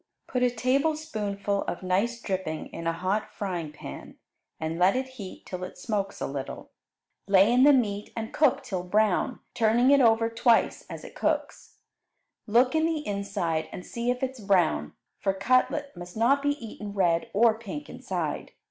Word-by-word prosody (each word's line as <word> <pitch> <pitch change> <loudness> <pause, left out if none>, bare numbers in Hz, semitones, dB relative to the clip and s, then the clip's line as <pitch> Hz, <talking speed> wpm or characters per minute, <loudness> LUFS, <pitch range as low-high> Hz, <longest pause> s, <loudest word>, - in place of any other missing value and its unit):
Put 250 - -2
a 250 - +4
tablespoonful 240 -6 0
of 175 - -4
nice 200 +6 0
dripping 185 -7 -4
in 165 - -4
a - - +3
hot 185 +5 -2
frying 175 -6 -4
pan, 70 - -10 0.4
and 160 +1 -3
let 185 +4 +5
it 260 0 -2
heat 210 -8 -9
till 185 -1 -6
it 185 - -7
smokes 200 -4 -2
a - - -2
little. 135 -1 -6 0.6
Lay 195 +3 +5
in 255 +2 +6
the 290 - +8
meat 210 -6 +1
and 220 0 -4
cook 280 -2 +3
till 195 -8 -3
brown, 215 +6 +1
turning 235 +4 +4
it 280 -1 +6
over 225 -1 +4
twice 230 0 +2
as - - -7
it - - -10
cooks. - - -2 0.7
Look 245 +4 +4
in 320 0 +3
the 315 -2 -2
inside 200 -5 -2
and 180 - -8
see 235 +1 -3
if 250 +1 -1
it 260 - 0
is 260 - -14
brown, 175 - +2 0.3
for 195 - +1
cutlet 255 +6 +1
must 175 +2 -9
not 265 +5 +4
be 285 0 +2
eaten 215 -5 -8
red 175 -4 +1
or 225 +2 +5
pink 265 +7 -6
inside. - - -4
215 Hz, 175 wpm, -27 LUFS, 185-255 Hz, 0.7 s, the